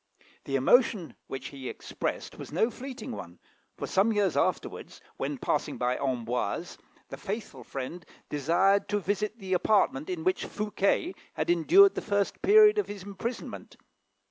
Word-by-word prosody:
The 135 - -2
emotion 190 - +3
which 135 - -6
he 135 -3 -7
expressed - - -5
was - - -8
no 220 +10 +2
fleeting 260 +1 -7
one, 85 - -8 0.4
for, - - -3
some 200 +4 +2
years 205 -5 +1
afterwards, - - -1 0.2
when - - -3
passing - - -1
by 125 +1 +1
Amboise, 125 -5 -2 0.3
the - - -7
faithful 195 - -5
friend 135 +8 -6 0.2
desired 175 +8 +2
to 205 - +1
visit 205 +3 -2
the 190 -3 -4
apartment 180 -6 +2
in 175 -3 -3
which 185 - +1
Fouquet 210 - 0 0.2
had - - +1
endured 380 - +6
the - - -3
first 200 -2 -1
period 425 +3 +7
of 415 - 0
his 205 -2 -7
imprisonment. 205 +5 -6
195 Hz, 150 wpm, -28 LUFS, 145-220 Hz, 0.4 s, period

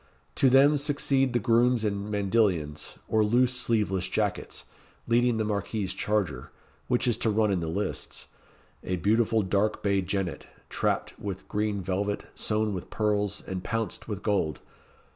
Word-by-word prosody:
To 135 - +4
them 140 +3 +6
succeed 140 -2 +2
the 120 - +1
grooms 120 +1 +3
in 100 0 -2
mandilions, 100 -7 0
or 110 -1 +3
loose 120 +4 +3
sleeveless 105 -7 0
jackets, - - -2 0.4
leading 120 0 +2
the 110 - 0
Marquis's 100 -2 -2
charger, 95 -10 -1 0.4
which 125 0 +1
is 120 -3 +2
to 115 - 0
run 105 -1 +2
in 95 - +1
the 85 - -3
lists 100 +6 -4 0.6
a 90 - -1
beautiful 110 +4 +2
dark 100 +3 0
bay 100 -1 +2
jennet 95 -2 -3 0.2
trapped - - -1
with 95 -2 -6
green 105 -2 -1
velvet, 100 +3 -2
sewn 105 -1 0
with 90 - -6
pearls, 105 -2 -1
and 95 -1 -5
pounced 115 -1 -3
with 105 -3 -5
gold. 95 -9 0
105 Hz, 150 wpm, -27 LUFS, 95-115 Hz, 0.6 s, them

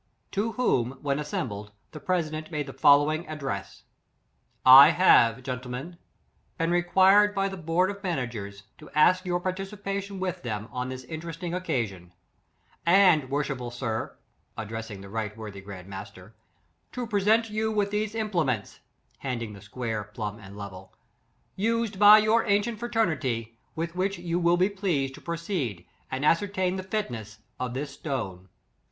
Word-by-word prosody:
To 220 +3 -1
whom, 130 - +1
when 140 0 0
assem 150 0 -2
15 - - -4
bled, 105 -1 -8 0.2
the 155 - -8
president 155 -1 -2
made 150 -3 -3
the 135 - -8
following 145 +5 +4
ad 155 - -6
dress: 100 -10 -5 0.4
" - - -43 0.2
I - - +7
have, 120 -9 +5
gentlemen, 130 +6 -6 0.6
been 165 +1 0
requested 190 +4 +5
by 195 0 +1
the 195 - -6
board 175 +3 +1
of 200 0 -10
managers, 120 - -4 0.2
to 150 - -12
ask 185 +5 +4
your 175 0 +1
par 185 +1 -1
ticipation 195 0 -5
with 185 -1 -3
them 110 -2 -4
on 125 0 -3
this 130 0 -6
interesting 165 +3 -6
oc 180 +1 -3
casion; 95 - -3 0.7
and, 170 -6 +5
worshipful 135 -3 -2
sir, 120 -2 -4 0.4
(addressing 110 -2 -6
the 100 +2 -11
R. 110 -2 -1
w. 105 0 -9
G. 95 -2 -10
Master) 100 +1 -10 0.6
to 250 - -3
present 220 +1 +2
you 220 +1 0
with 205 -2 0
these 210 +1 -1
implements, 170 - -1 0.4
(handing 120 -5 -4
the 100 - -12
square, 110 0 -4
plumb, 105 0 -6
and 100 -1 -12
level,) 95 -2 -9 0.6
used 225 -1 -1
by 210 +1 +10
your 215 +2 +3
ancient 205 +2 +1
fraternity, 140 - -1 0.2
with 165 +1 -3
which 195 +2 -1
you 175 0 -2
will 170 0 +3
be 185 +2 +4
pleased 180 -10 -1
to - - -12
proceed 165 - -3 0.2
and 130 +2 -2
ascertain 190 +2 +1
the - - -3
fitness 120 - -4 0.2
of 125 -1 -3
this 140 +1 -3
stone." 100 - -5
155 Hz, 160 wpm, -27 LUFS, 115-190 Hz, 0.7 s, by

